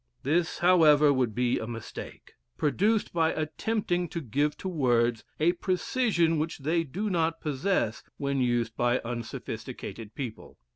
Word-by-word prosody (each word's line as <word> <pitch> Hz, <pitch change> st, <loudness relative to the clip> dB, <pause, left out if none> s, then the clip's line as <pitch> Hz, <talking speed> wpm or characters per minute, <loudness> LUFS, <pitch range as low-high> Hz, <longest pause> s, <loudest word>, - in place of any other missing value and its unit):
This, 160 Hz, +4 st, +1 dB
however, 155 Hz, -5 st, +6 dB
would 125 Hz, -5 st, 0 dB
be 125 Hz, 0 st, +1 dB
a 110 Hz, -, -5 dB
mistake, 115 Hz, -1 st, -8 dB, 0.2 s
produced 205 Hz, +9 st, +1 dB
by 165 Hz, -1 st, +2 dB
attempting 175 Hz, +2 st, -1 dB
to 170 Hz, -, -3 dB
give 145 Hz, +2 st, -1 dB
to -, -, -5 dB
words 120 Hz, -8 st, +1 dB, 0.2 s
a 160 Hz, +3 st, +4 dB
precision 180 Hz, -, +1 dB
which 160 Hz, +2 st, -2 dB
they 160 Hz, +4 st, 0 dB
do 180 Hz, +9 st, -4 dB
not 165 Hz, -4 st, 0 dB
possess 145 Hz, -, 0 dB, 0.2 s
when 140 Hz, -1 st, -1 dB
used 120 Hz, -2 st, 0 dB
by 120 Hz, +1 st, +2 dB
unsophisticated 115 Hz, -1 st, -6 dB
people. 125 Hz, -6 st, -7 dB
150 Hz, 140 wpm, -28 LUFS, 120-175 Hz, 0.2 s, however